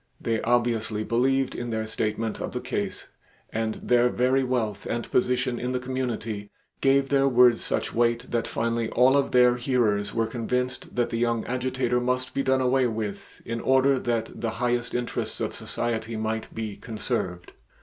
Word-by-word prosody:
They 115 -1 -1
obviously 115 -3 +1
believed 130 +4 +1
in 120 0 -4
their 110 -1 -1
statement 110 0 -2
of - - -4
the - - -2
case - - -4 0.4
and 110 0 -1
their 125 0 +3
very 130 +2 +2
wealth 120 -5 -1
and 120 0 -2
position 125 0 +1
in 125 +1 -2
the 125 - 0
community 115 -5 -3 0.3
gave 135 0 +3
their 135 -1 +3
words 125 -2 +5
such - - -2
weight 120 +1 +2
that 115 -1 0
finally 115 0 -1
all 130 +2 +4
of 140 -1 +2
their 125 -1 +5
hearers 120 -5 +1
were 115 -1 +1
convinced 125 +2 -3
that 120 -1 +1
the 115 - -1
young 115 -1 +1
Agitator 125 -1 0
must 125 +1 -1
be 140 - 0
done 130 -1 +2
away 130 0 +3
with 110 -3 -5
in 115 0 -3
order 130 0 +4
that 115 -2 -2
the 115 - 0
highest 120 0 0
interests 120 -1 -3
of - - -2
society 115 -1 -3
might 110 0 -3
be 110 -2 -5
conserved. 105 -6 -4
120 Hz, 170 wpm, -26 LUFS, 115-125 Hz, 0.4 s, words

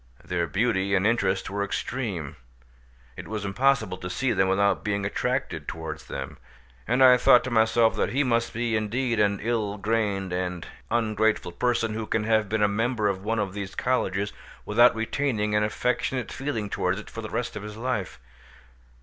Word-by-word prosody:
Their 85 -1 -1
beauty 100 -1 +1
and 95 +1 +2
interest 100 -4 +1
were 100 0 -1
extreme; 100 - -3 0.8
it - - -8
was 105 -1 -4
impossible 110 -3 +1
to 90 - -5
see 130 +6 0
them 95 -2 +2
without 100 +1 +2
being 100 -2 -1
attracted 100 - -2
towards 80 -2 -6
them; - - -6 0.5
and 125 +3 +3
I 125 -1 +8
thought 120 0 +6
to 130 - -4
myself 110 0 +3
that - - +1
he 140 +3 +1
must 115 -3 +1
be 115 0 -1
indeed 115 +2 0
an 100 -1 +2
ill 110 -3 -1
grained 100 -3 -1
and 90 -2 -3 0.2
ungrateful 110 -4 +1
person 115 +1 0
who 110 0 -4
can 110 - 0
have 110 -2 +2
been 110 0 +1
a - - +5
member 110 +1 0
of 95 -1 -3
one 115 +2 -1
of 100 -3 -1
these 100 -1 -6
colleges 105 -5 0 0.3
without 120 +3 +5
retaining 110 -2 -1
an 105 0 +3
affectionate 125 +3 -1
feeling 130 -7 -3
towards 95 -1 -1
it 110 - -11
for 115 - -6
the 110 - -6
rest 120 - -3
of 105 - -5
his 105 +1 -8
life. 115 -6 -3
110 Hz, 180 wpm, -26 LUFS, 100-120 Hz, 0.8 s, I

